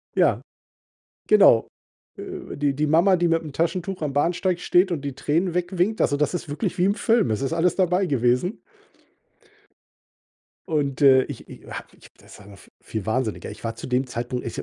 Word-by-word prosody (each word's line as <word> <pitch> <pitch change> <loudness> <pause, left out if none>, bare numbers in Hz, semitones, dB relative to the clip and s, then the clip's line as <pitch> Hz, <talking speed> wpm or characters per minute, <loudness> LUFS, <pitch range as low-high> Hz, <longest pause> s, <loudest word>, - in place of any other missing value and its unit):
Ja, - - +3 0.9
genau. 200 - +6 0.5
Äh, - - -8
die 145 -1 +1
die 150 +1 0
Mama, 170 +5 +4
die 175 0 +1
mit'm 160 -3 -1
Taschentuch 180 +3 -2
am 145 -3 -2
Bahnsteig 175 +4 0
steht 180 +1 +2
und 155 -5 -2
die 140 -2 -5
Tränen 170 +5 0
wegwinkt, 180 +4 0
also, 145 - +2
das 150 +4 0
ist 165 -4 -5
wirklich 180 +6 -3
wie 180 - +2
im 200 +1 +2
Film. 225 - +2
Es 110 - -1
ist 140 +4 -1
alles 170 +2 +1
dabei 185 0 +2
gewesen. 125 - 0 2.1
Und, 145 -3 -1
äh, 130 -2 +6
ich - - -9
ich - - -12
ich - - -14
ha - - -6 0.3
das - - -16
war 100 - -15
noch 100 -1 -13
v - - -19
viel 110 -3 -6
Wahnsinniger. 110 -2 -2
Ich 105 - -13
war 115 0 -3
zu - - -8
dem 130 +1 0
Zeitpunkt 120 +1 -4
ich 115 - -4
155 Hz, 190 wpm, -23 LUFS, 130-180 Hz, 2.1 s, genau